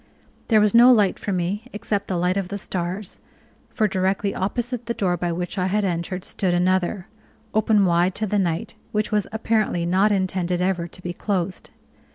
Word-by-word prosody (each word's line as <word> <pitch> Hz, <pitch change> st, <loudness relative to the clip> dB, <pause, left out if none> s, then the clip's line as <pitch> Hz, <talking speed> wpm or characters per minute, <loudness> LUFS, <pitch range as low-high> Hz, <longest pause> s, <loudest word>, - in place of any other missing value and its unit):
There 220 Hz, -2 st, +5 dB
was 210 Hz, -1 st, +3 dB
no 240 Hz, +2 st, +8 dB
light 210 Hz, -6 st, +3 dB
for 205 Hz, -, -3 dB
me 190 Hz, +5 st, -2 dB
except 205 Hz, -1 st, -2 dB
the 185 Hz, -, -1 dB
light 180 Hz, +2 st, +1 dB
of 195 Hz, -2 st, -1 dB
the 200 Hz, +2 st, -4 dB
stars; 185 Hz, +1 st, -4 dB, 0.5 s
for 215 Hz, -, +1 dB
directly 195 Hz, +1 st, 0 dB
opposite 240 Hz, +5 st, -3 dB
the 235 Hz, -, -2 dB
door 180 Hz, -3 st, +1 dB
by 175 Hz, 0 st, -2 dB
which 180 Hz, +3 st, -3 dB
I 180 Hz, -, +1 dB
had 205 Hz, +2 st, +1 dB
entered 180 Hz, +1 st, -3 dB
stood 180 Hz, -3 st, -1 dB
another, 185 Hz, +1 st, +1 dB, 0.5 s
open 215 Hz, -1 st, +3 dB
wide 175 Hz, +1 st, +2 dB
to 215 Hz, -, -1 dB
the 205 Hz, 0 st, 0 dB
night, 170 Hz, -3 st, -1 dB, 0.2 s
which 210 Hz, 0 st, -1 dB
was 210 Hz, -2 st, +1 dB
apparently 220 Hz, -5 st, 0 dB
not 190 Hz, +4 st, +3 dB
intended 185 Hz, -2 st, 0 dB
ever 180 Hz, -2 st, 0 dB
to 185 Hz, -, -12 dB
be 175 Hz, -, -3 dB
closed. 185 Hz, -1 st, -3 dB
190 Hz, 190 wpm, -23 LUFS, 180-210 Hz, 0.5 s, no